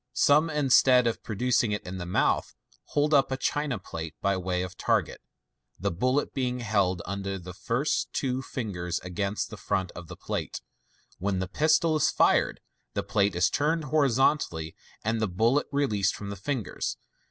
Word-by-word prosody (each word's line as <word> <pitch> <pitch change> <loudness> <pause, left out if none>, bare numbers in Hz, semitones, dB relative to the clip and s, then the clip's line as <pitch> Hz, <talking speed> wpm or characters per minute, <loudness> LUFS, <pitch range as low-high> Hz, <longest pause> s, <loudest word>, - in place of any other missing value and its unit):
Some, 150 +3 +4
in 150 -4 0
stead 125 -1 +6
of 115 - -1
producing 120 0 +1
it 105 - -3
in 95 +1 -6
the 90 - -5
mouth, 90 - +1 0.3
hold 150 +1 +1
up 140 -1 +4
a 130 - 0
china 145 -2 -1
plate 80 -4 -7
by 100 0 +1
way 90 -1 -1
of 90 - -7
target, - - 0 0.6
the - - 0
bullet 130 +11 0
being 125 -2 -1
held 100 -5 +1
under 100 0 -3
the 90 0 -9
two - - -20
first 125 +6 0 0.3
fingers 90 -8 -3
against 100 +3 -3
the - - -7
front 95 -2 -1
of 85 -1 -10
the - - -8
plate. - - -4 0.6
When 95 +1 0
the 95 0 -2
pistol 155 - +2
is 150 - +3
fired, - - +2 0.3
the - - 0
plate 100 -2 +1
is 90 +1 +4
turned 155 +2 +1
hori 150 -1 +2
zontally, 115 - +1 0.3
and 115 0 0
the 110 - +2
bullet 115 +10 +2
released 110 -9 +1
from 100 -1 -6
the - - -4
fingers. 115 +2 -3
105 Hz, 175 wpm, -27 LUFS, 95-135 Hz, 0.6 s, stead